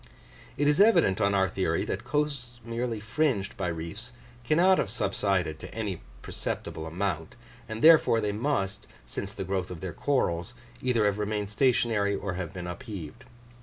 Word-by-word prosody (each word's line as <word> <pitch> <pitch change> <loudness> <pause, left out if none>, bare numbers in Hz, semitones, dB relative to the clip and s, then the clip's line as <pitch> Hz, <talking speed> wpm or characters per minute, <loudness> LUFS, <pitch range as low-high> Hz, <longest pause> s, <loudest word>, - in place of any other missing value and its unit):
It 145 - +2
is 150 +5 +4
evident, 170 - +5
on 100 0 +3
our 95 -1 +3
theory, - - 0
that - - -3
coasts 140 -5 -2
merely 115 -1 -2
fringed 115 -2 0
by 95 - -2
reefs 85 +8 -5 0.3
cannot 175 +9 +4
have - - 0
subsided 95 -7 0
to - - -9
any 105 -6 -3 0.2
perceptible 80 0 -4
amount; 85 -1 -3 0.3
and 110 0 -5
therefore 160 -7 +7
they 105 -2 0
must, 105 -4 -1 0.2
since 95 +11 -5
the 100 - -5
growth 95 0 -2
of 90 -3 -7
their 90 0 -5
corals, 90 -12 0 0.3
either 120 -4 +2
have 100 0 +1
remained 105 -1 -1
stationary 110 -4 +2
or 100 -1 -3
have 90 -2 -4
been 90 -2 -6
upheaved. 90 - -7
105 Hz, 165 wpm, -28 LUFS, 95-120 Hz, 0.3 s, therefore